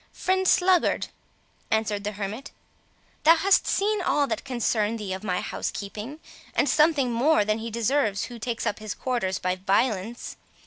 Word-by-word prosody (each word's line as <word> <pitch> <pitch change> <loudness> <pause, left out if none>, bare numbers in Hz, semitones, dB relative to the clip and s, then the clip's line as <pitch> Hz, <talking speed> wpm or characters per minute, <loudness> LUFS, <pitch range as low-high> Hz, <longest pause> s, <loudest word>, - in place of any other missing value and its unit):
"Friend 375 0 0
Sluggard," 360 -1 +3 0.6
answered 215 -2 0
the 210 - -2
hermit, 205 +5 -5 0.7
"thou 325 +2 +7
hast 385 +4 +3
seen 415 0 +1
all 295 -5 +2
that - - -3
can 265 -2 -6
concern 225 -1 0
thee 205 -4 -4
of 190 +2 -6
my 180 -3 -1
housekeeping, 215 +8 -5 0.4
and - - +2
something 300 -5 +3
more 245 0 +3
than 215 +1 0
he 230 +1 -5
deserves 230 -2 0
who 240 -2 -7
takes 230 +1 -3
up 205 - -1
his 215 -2 -5
quarters 235 -8 -1
by 185 0 -1
violence. 200 +3 -1
230 Hz, 165 wpm, -25 LUFS, 205-290 Hz, 0.7 s, thou